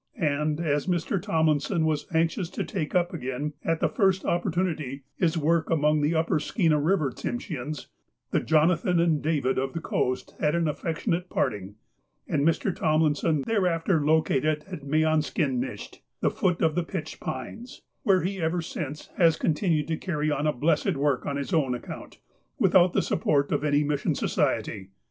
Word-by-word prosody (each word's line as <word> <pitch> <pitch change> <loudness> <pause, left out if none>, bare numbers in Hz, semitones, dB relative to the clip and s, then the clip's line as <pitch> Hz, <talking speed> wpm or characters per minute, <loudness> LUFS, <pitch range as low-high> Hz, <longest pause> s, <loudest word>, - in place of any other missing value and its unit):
And, 150 -3 0
as 150 -2 0
Mr. 175 +1 0
Tomlinson 160 -3 +1
was 155 -2 -1
anxious 165 +2 0
to - - -3
take 170 -5 -4
up 175 0 +2
again, 145 0 -3
at 165 -1 0
the - - +4
first 190 -3 +1
opportunity, 160 -6 -1
his 170 -2 +1
work 165 +1 +1
among 150 -1 +2
the 150 +3 +1
upper 160 -1 +1
Skeena 160 -3 +1
River 155 -3 +1
Tsimsheans, 150 - -5 0.5
the - - +2
Jonathan 165 +3 +2
and 165 -3 +2
David 145 -5 0
of 135 0 -2
the 165 - -3
Coast 130 -5 -2
had 150 +1 +1
an 170 -1 +1
affectionate 165 +3 -2
parting, 100 -1 -2 0.5
and - - 0
Mr. 165 +4 +1
Tomlinson 155 -1 +1
thereafter 180 -6 +1
located 155 -1 +2
at 180 -6 -7
Meanskinisht 155 -3 0 0.2
(the - - +1
foot 180 -2 0
of 160 -1 +3
the 175 +2 0
pitch 165 -2 -6
pines), 225 - -7 0.2
where 195 -5 +3
he 190 0 -2
ever 165 +1 0
since 150 -2 -6
has 165 -3 +4
continued 155 -2 +1
to 160 - 0
carry 155 -4 -1
on 150 +1 0
a - - +3
blessed 155 +6 +1
work 140 -2 0
on 140 - -1
his 140 +7 -4
own 135 -6 +2
account, 120 - -9 0.4
without 180 -1 +4
the - - +2
support 145 -3 +1
of 145 0 0
any 145 0 +2
mission 145 -1 0
society. 95 -1 -1
155 Hz, 165 wpm, -26 LUFS, 145-170 Hz, 0.5 s, the